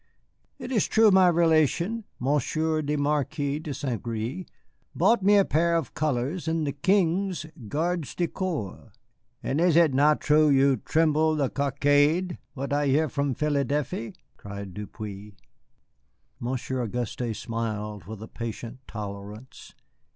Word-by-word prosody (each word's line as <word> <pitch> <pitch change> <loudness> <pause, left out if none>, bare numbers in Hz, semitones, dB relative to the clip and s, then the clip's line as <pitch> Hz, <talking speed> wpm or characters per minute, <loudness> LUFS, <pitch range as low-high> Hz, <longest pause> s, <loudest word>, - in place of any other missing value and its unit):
It 250 - -7
is 220 -7 +2
true 220 -1 +5
my 190 -1 +6
relation, 170 - +2
Monsieur 155 +4 0
le 150 0 -1
Marquis 145 0 -1
de 155 -1 -6
St. 135 -5 -3
Gré, 120 +10 -4 0.5
bought 235 -2 +3
me 205 +2 +5
a 200 - +5
pair 170 +2 +2
of 165 - -2
colors 150 +4 -1
in 160 0 0
the 145 - -1
King's 180 +1 +1 0.2
gardes 165 - -2
du 175 - 0
corps." 160 - -4 0.5
"And 145 +5 0
is 175 -2 +4
it 165 -4 +5
not 150 +3 +4
truth 150 -1 +4
you 135 0 +4
tremple 155 +3 +2
the 140 -3 0
coackade, 145 +5 +2 0.2
what 140 +1 -3
I 145 0 +1
hear 150 +3 +2
from 140 -1 -1
Philadelphe?" 140 -5 -1 0.2
cried 100 -2 -8
Depeau. 105 0 -8 1.1
Monsieur 130 +1 -3
Auguste 120 0 -3
smiled 105 -4 -4
with 110 +2 -8
a - - -8
patient 115 +2 -6
tolerance. 105 +3 -8
145 Hz, 135 wpm, -26 LUFS, 120-165 Hz, 1.1 s, my